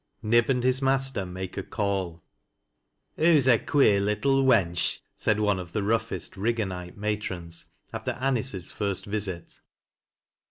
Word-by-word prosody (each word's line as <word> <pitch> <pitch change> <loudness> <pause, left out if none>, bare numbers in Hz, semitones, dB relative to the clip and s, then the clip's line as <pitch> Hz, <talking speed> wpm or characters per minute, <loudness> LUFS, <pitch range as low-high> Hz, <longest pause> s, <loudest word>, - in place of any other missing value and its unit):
KIE 115 +2 +4
ASH) 125 +1 0
HIS 130 +1 +2
MASTEB 135 -6 0
MAKTi: 90 0 -6
A - - -4
CALL. 95 -6 -3 0.5
" - - -51
Hoo's 155 -4 +4
a 120 -4 +6
queer 110 -9 +3
little 135 +7 +2
wench," 95 -10 +2 0.2
said 105 0 +1
one 105 -3 +1
of 85 -2 -8
the 105 - 0
rougheBt 110 +2 -1
Iligganite 95 -4 -3
matrons, 95 -5 -4 0.3
after - - -3
Aniee's 125 -7 -1
first 100 -3 -1
visit. 100 -4 -5
105 Hz, 135 wpm, -26 LUFS, 95-125 Hz, 0.5 s, a